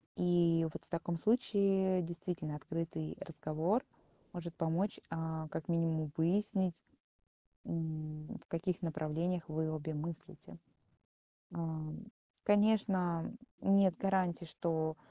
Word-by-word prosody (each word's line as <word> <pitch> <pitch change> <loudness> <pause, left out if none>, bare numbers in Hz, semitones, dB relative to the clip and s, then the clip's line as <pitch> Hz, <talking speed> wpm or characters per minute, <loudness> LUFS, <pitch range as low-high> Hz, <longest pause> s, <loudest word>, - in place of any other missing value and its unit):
И 170 -2 +4
вот - - -7
в - - -18
таком 170 0 -1
случае 195 -4 +3
действительно 165 -2 -3
открытый 160 +1 -3
разговор 165 +8 0 0.5
может 170 -1 -5
помочь, 165 +5 0
э, 160 -1 -2
как 150 - -4
минимум 160 -3 +1
выяснить, 185 +1 +2 0.9
м, 155 -2 -3 0.2
в - - -22
каких 180 +2 -1
направлениях 165 +2 -1
вы 155 0 0
обе 155 0 -3
мыслите. 160 +2 -6 0.9
Э, - - -8 0.9
конечно, 205 -5 +3 0.3
нет 195 -2 +5
гарантии, 185 -3 +1
что 160 -1 -1
165 Hz, 105 wpm, -35 LUFS, 160-185 Hz, 0.9 s, нет